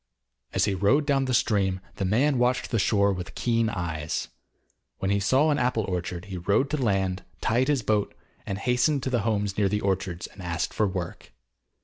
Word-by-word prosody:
As - - +2
he 100 - 0
rowed 115 +11 +3
down 135 -2 +2
the 130 - -1
stream, 95 -5 +1 0.2
the 95 - -1
man 125 +7 +2
watched 125 +1 +1
the 115 - +1
shore 100 0 +3
with 90 -2 -7
keen 115 -2 +1
eyes. 80 -6 -3 0.7
When 95 - -1
he 100 - +2
saw 135 +10 +3
an 145 - +1
apple 125 -3 +1
orchard 90 -1 -3
he 95 -2 -6
rowed 100 +10 +1
to 150 - +1
land, 95 -6 0 0.2
tied 120 +4 +1
his 145 -5 +1
boat, 105 -1 0 0.3
hastened 125 +8 +1
to 130 - -2
the 120 - +2
homes 105 -2 -1
near 100 -2 +3
the 105 +1 -1
orchards 95 -3 -1
and 95 - -12
asked 85 -1 -2
for 105 - +2
work. 90 -2 -5
100 Hz, 195 wpm, -26 LUFS, 95-125 Hz, 0.7 s, rowed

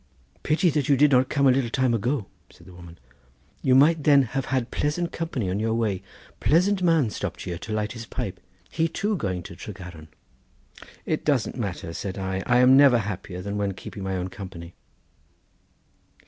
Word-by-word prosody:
"Pity 165 +3 +2
that 145 -2 -1
you 140 - +5
did 145 +2 +5
not 130 0 +4
come 140 -1 +1
a 130 - +7
little 125 -2 +1
time 130 0 +1
ago," 120 +1 -1 0.2
said - - -19
the 95 - -14
woman; 85 -1 -13 0.6
"you 130 -1 +3
might 150 +3 +5
then 140 -2 +6
have 130 +2 -3
had 130 -2 -1
pleasant 170 +4 -1
company 150 - -3
on 95 +3 -1
your 110 +1 0
way; 105 -5 -1 0.4
pleasant 185 +5 +2
man 165 -10 +3
stopped 100 -5 -5
here 85 -2 -5
to 110 - -8
light 105 0 -1
his 115 -1 -8
pipe; - - -5 0.3
he 165 0 +1
too 205 +6 -1
going 95 - -3
to 85 - -10
Tregaron." 90 -5 -10 1.0
"It - - -1
doesn't - - 0
matter," 80 - -4
said 95 +3 -5
I; 95 0 -2
"I 125 - +4
am 125 +1 +6
never 135 -3 +7
happier 95 -3 -5
than 100 +1 -4
when 100 -2 -1
keeping 100 - -9
my 95 -1 -2
own 90 +1 -3
company." 90 -4 -9
115 Hz, 190 wpm, -25 LUFS, 95-140 Hz, 1.0 s, a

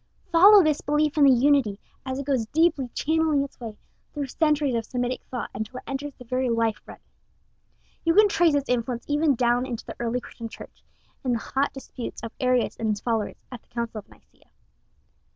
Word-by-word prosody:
Follow 390 +4 +8
this 305 -2 +1
belief 295 +1 +1
in 295 -2 +5
the 275 - +7
Unity, 255 -5 +3 0.3
as 260 0 -2
it 275 - -4
goes 260 -6 0
deeply 300 -3 +2
channeling 315 -2 +1
its 280 - -10
way 225 -3 -7 0.3
through 290 -2 -3
centuries 295 0 +1
of 230 -1 0
Semitic 245 +2 -3
thought, 245 -4 -5
until 220 +5 -5
it - - -8
enters 280 +2 -4
the 250 - -13
very 255 +1 -1
life 230 -2 0
blood. - - -10 1.1
You 330 0 +2
can 425 0 +7
trace 345 -6 +3
its 280 -1 0
influence 245 0 -1
even 295 -1 +2
down 245 +1 +1
into 235 -3 -5
the - - -8
early 240 +1 -1
Christian 230 -2 -9
Church, - - -13 0.4
in 255 -2 0
the - - +1
hot 270 +4 -1
disputes 260 -3 -8
of 230 - -5
Arius 255 -1 +1
and 225 - -1
his 210 -1 0
followers, 225 -3 -2
at 245 -3 -8
the - - -36
Council 235 -2 -4
of 205 - -15
Nicea. - - -24
255 Hz, 200 wpm, -25 LUFS, 235-290 Hz, 1.1 s, Follow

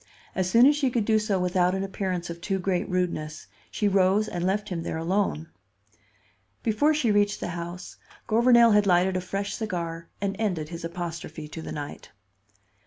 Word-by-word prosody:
As 185 -1 0
soon 230 +5 +6
as 290 +2 +6
she 285 -3 +1
could 235 -3 0
do 220 0 +3
so 210 -2 0
without 180 0 +2
an 190 - -2
appearance 185 -3 -3
of 170 0 -9
too 195 +2 -1
great 185 -1 -1
rudeness, 155 -4 -2 0.2
she 210 - 0
rose 195 +2 +3
and 175 -1 -4
left 205 +3 0
him 175 -3 -3
there 165 - -3
alone. 165 -2 -1 1.1
Before 230 +8 +3
she 290 -8 +1
reached 205 0 +2
the - - -4
house, 175 +1 -7 0.3
Gouvernail 235 +1 +5
had 210 -1 +4
lighted 180 +1 +3
a 185 - 0
fresh 195 +2 -3
cigar 170 -6 -4
and 195 0 -2
ended 175 -9 -1
his 170 -1 -7
apostrophe 165 -2 -6
to 160 - -7
the - - -7
night. 145 -1 -7
185 Hz, 180 wpm, -26 LUFS, 170-210 Hz, 1.1 s, soon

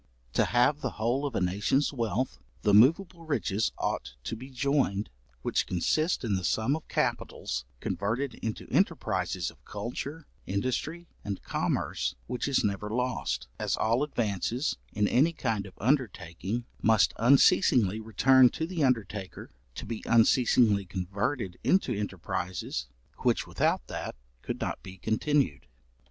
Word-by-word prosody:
To - - +3
have 125 +6 +3
the 130 - -1
whole 120 +6 0
of 130 - -6
a - - +2
nation's 105 +11 +1
wealth, 120 0 -1 0.2
the 105 - +3
moveable 165 - +4
riches 110 - 0
ought - - -3
to 70 - -3
be 130 +4 -9
joined, 130 -6 0 0.3
which - - 0
consist 155 - +1
in 110 -4 0
the 95 -1 -1
sum 110 +9 +1
of 160 - -8
capitals 60 0 -2
converted 115 - -2
into 110 -1 -4
enterprises - - 0
of - - -25
culture, 135 +9 -5 0.2
industry, 130 - -2 0.2
and 100 -2 -4
commerce, - - -1
which 125 - -3
is 140 - +2
never 105 0 -1
lost; 120 - -1
as - - 0
all 115 +4 +2
advances, 120 -1 -1 0.2
in 105 0 +1
any 150 +10 +3
kind 110 -9 -2
of 95 - -15
undertaking, 105 - -1 0.2
must 110 -2 +4
unceasingly 120 - +5
return 125 +4 +5
to 160 - -3
the 170 -2 -2
undertaker, 105 -7 -1 0.2
to - - -6
be 115 -1 -5
unceasingly 115 -2 +4
converted 95 +3 -3
into 190 - +3
enterprises, 95 -7 -3 0.3
which - - +1
without - - 0
that - - -5 0.3
could - - -4
not - - -3
be 95 0 -10
continued. 110 - 0
115 Hz, 140 wpm, -29 LUFS, 100-135 Hz, 0.3 s, unceasingly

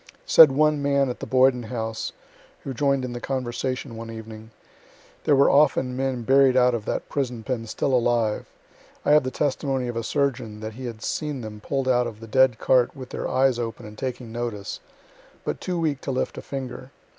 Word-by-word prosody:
Said 155 -4 +8
one 150 +3 +3
old 145 - -4
man 140 -1 +2
at - - -8
the - - -6
Boyden 130 -1 +4
House, 115 -2 -3 0.5
who 135 - -4
join'd 140 0 +1
in 125 - -5
the 120 - -6
conversation 130 -1 -3
one 115 0 -7
evening: 110 -1 -9 0.8
'There 145 - +5
were 140 - +5
often 135 -3 +3
men 130 -2 -2
buried 135 +1 +5
out 125 -1 +5
of 110 -3 -3
that - - -3
prison 125 -5 -3
pen 120 -3 -3
still 135 +4 -1
alive. 120 -3 +1 0.6
I - - +3
have 150 0 +7
the 130 - -3
testimony 135 -2 -1
of 120 - -4
a 115 - -1
surgeon 125 -5 -1
that 110 0 -5
he 130 +3 -8
had 115 -2 -7
seen 150 -4 -3
them 110 -2 -8
pull'd 135 +3 -2
out 125 -1 +3
of 110 -2 -8
the 115 - -9
dead 130 0 +4
cart 125 +2 +2
with 130 -2 -9
their - - -3
eyes 130 -1 +2
open 115 0 -5
and 105 0 -10
taking 125 -1 -5
notice, 115 -4 -4 0.6
but - - -3
too 180 -2 -2
weak 150 -4 -1
to - - -6
lift 130 - -2
a - - -6
finger. 130 -1 -6
130 Hz, 205 wpm, -24 LUFS, 115-135 Hz, 0.8 s, Said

